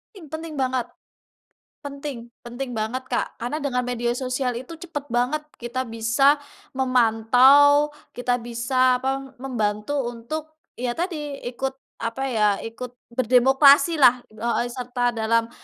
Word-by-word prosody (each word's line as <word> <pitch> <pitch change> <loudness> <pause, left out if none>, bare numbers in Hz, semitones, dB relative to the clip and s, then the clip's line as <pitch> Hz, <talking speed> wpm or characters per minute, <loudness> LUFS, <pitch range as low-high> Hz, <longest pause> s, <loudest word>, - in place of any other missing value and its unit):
Penting 360 - -11
penting 320 -1 -6
banget. 255 -2 0 1.0
Penting, 280 -5 -7 0.2
penting 245 +2 -5
banget, 230 +5 -2
Kak, - - -1
karena 270 +6 -2
dengan 265 -4 -1
media 240 -1 -1
sosial 255 0 -2
itu 260 +7 -8
cepet 320 -4 -6
banget 250 +6 0 0.2
kita 240 +2 -3
bisa 230 +5 +2 0.3
memantau. 260 +4 +5 0.2
Kita 245 0 0
bisa 250 +2 +1
apa, 270 0 -3
membantu 220 +1 -1
untuk, 300 +7 -6 0.2
ya 245 -1 -2
tadi 305 -4 -4
ikut 265 +2 -3 0.2
apa 230 +4 -4
ya, 220 -3 0 0.2
ikut 230 +2 -7 0.3
berdemokrasi 270 +6 +5
lah 250 -3 +5
heeh, 235 +2 -1
serta 245 0 -1
dalam, 230 0 0
255 Hz, 125 wpm, -23 LUFS, 240-280 Hz, 1.0 s, memantau